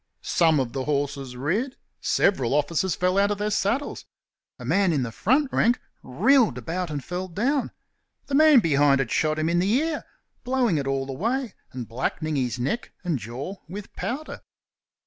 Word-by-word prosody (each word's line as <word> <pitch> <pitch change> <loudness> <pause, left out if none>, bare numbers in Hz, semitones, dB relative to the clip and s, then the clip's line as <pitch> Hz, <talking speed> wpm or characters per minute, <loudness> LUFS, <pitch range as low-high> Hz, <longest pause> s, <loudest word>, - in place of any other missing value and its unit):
Some 160 -3 +3
of 125 -3 -2
the 135 -1 -3
horses 140 -3 -2
reared; 205 - -1 0.2
several 135 - +2
officers 160 +5 +1
fell 185 +2 +1
out 200 0 +3
of 205 - -1
their 210 +1 -1
saddles; 220 +8 -1 0.5
a 125 - -9
man 185 +6 +3
in 140 -4 +1
the 115 - -4
front 265 - +1
rank 240 +2 +3 0.2
reeled 225 - +3
about 170 +8 -3
and 145 -3 -4
fell 180 +1 -4
down; 250 - 0 0.6
the 280 - -7
man 300 -3 +7
behind 145 -4 +4
had 135 -4 -1
shot 155 0 +1
him 155 0 0
in 170 +1 +2
the 190 +3 +1
ear, 310 +5 0 0.4
blowing 245 - +1
it 135 - -3
all 135 0 -1
away 230 - -2 0.2
and 125 -3 -6
blackening 145 +6 -2
his 125 -3 -1
neck 140 - -2
and 170 -7 -1
jaw 125 - -6
with 200 +3 -8
powder. 290 +5 -4
170 Hz, 175 wpm, -25 LUFS, 135-225 Hz, 0.6 s, man